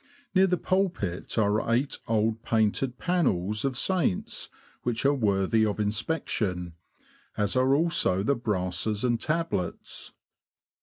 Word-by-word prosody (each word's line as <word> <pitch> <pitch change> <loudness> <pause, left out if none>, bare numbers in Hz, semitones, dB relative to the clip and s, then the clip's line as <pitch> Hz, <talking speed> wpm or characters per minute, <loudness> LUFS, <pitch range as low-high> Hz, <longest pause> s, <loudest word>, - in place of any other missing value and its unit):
Near 190 0 +5
the 180 -1 +1
pulpit 175 - -1
are 110 +1 +1
eight 130 +4 0
old 110 0 +1
painted 115 +3 0
panels 105 - 0
of 135 -3 -1
saints, 180 - 0 0.3
which 120 +1 -2
are 140 - +5
worthy 105 -3 +2
of 105 -1 0
inspection, 105 - -1 0.6
as 105 +1 +1
are 130 +2 +4
also 150 - +2
the 140 - +2
brasses 105 -1 -2
and 120 -2 +1
tablets. 155 - -3
115 Hz, 120 wpm, -27 LUFS, 100-140 Hz, 0.6 s, Near